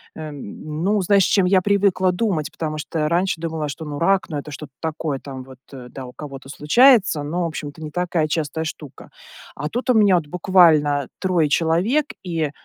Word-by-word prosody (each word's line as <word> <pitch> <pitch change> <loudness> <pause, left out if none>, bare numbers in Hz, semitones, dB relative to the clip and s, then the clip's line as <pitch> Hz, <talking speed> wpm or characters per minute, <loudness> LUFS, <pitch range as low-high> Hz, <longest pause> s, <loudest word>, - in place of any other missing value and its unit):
эм, 150 +1 -7
ну, 205 +1 +2
знаешь, 195 +1 +4
чем 195 0 +3
я 185 0 +4
привыкла 190 -2 +2
думать. 180 -6 -1
Потому 155 -1 -4
что 150 0 -2
раньше 175 0 0
думала, 160 -2 -3
что, 160 +3 -7
ну, 145 -1 -5
рак, 195 +2 +2
ну, 150 - -3
это 145 +1 -7
что-то 145 -2 -9
такое, 155 -3 -3
там 130 -2 -8
вот, 130 -1 -14
э, 130 -3 -10
да, 130 +1 -8
у 125 - -10
кого-то 135 -3 -9
случается, 195 - +4
но, 170 +4 -2
в - - 0
общем-то, 155 -1 -7
не 155 - -6
такая 175 -2 0
частая 160 0 -2
штука. 150 -3 -8 0.5
А 150 0 -4
тут 245 - -4
у 250 - +6
меня, 205 -4 +5
вот, 160 -4 -1
буквально 155 -5 +3
3 180 -4 +1
человек, 180 - +1 0.2
и, 165 -5 -2
160 Hz, 195 wpm, -21 LUFS, 150-185 Hz, 0.5 s, у